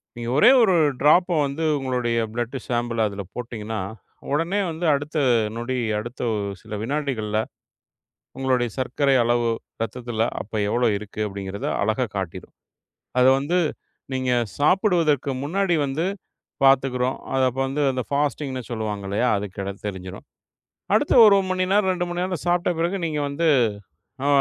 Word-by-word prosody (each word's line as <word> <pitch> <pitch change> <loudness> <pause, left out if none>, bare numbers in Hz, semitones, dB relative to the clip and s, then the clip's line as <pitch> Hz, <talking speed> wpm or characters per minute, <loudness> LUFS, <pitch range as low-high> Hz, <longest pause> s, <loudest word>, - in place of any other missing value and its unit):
நீங்க 120 0 -5
ஒரே 195 - +7
1 205 -5 +4 0.3
டிராப்ப 170 +3 +4
வந்து 140 +4 -3
உங்களோட 130 -3 -2 0.3
பிளட் 120 +3 -3
சாம்பிள் 120 -1 -1
அதுல 100 -1 -6
போட்டீங்கன்னா, 115 -2 -5 0.5
உடனே 165 +7 +1
வந்து 160 +2 -4
அடுத்த 145 +2 -3 0.4
நொடி. 125 +2 -2 0.2
அடுத்த 120 +4 -7 0.4
சில 110 -1 -7
வினாடிகள்ல 120 -6 -1 1.0
உங்களோட 130 -2 +1
சர்க்கரை 135 +2 +1
அளவு 120 0 +2 0.3
ரத்தத்துல 115 0 -2 0.2
அப்ப 105 - -21 0.2
எவ்வளோ 120 +3 +1
இருக்கு 105 +1 -9
அப்டிங்கிறத 100 0 -5 0.2
அழகா 110 +4 +1
காட்டிரும். 95 -4 -5 0.7
அத 125 - +6
வந்து 155 +6 0 0.6
நீங்கச் 125 -4 0
சாப்பிடுவதற்கு 165 - +2
முன்னாடி 180 +5 0
வந்து 145 +6 -1 0.6
பாத்துக்கிறோம். 130 -1 +3 0.2
அத 130 - +2
அப்ப 130 +2 -5
வந்து 145 +2 -1
அந்த 130 0 -2
பாஸ்ட்டீங்ன்னு 140 -3 -1
சொல்லுவாங்க 105 -3 -3
இல்லையா? 105 +6 +1
அதுகிட 100 -1 -5
தெரிஞ்சுரும். 95 -1 -8 0.7
அடுத்த - - +2
1 205 -2 +7 0.2
மணி 185 0 +1
நேரம், 200 -1 +3
2 180 -1 -1
மணி 175 - -3
நேரம் 180 -2 -2
சாப்பிட்ட 175 0 +2
பிறகு 170 +4 0
நீங்க 155 -2 -2
வந்து 140 +4 -2 0.8
ஆ - - +2
130 Hz, 135 wpm, -23 LUFS, 115-155 Hz, 1.0 s, ஒரே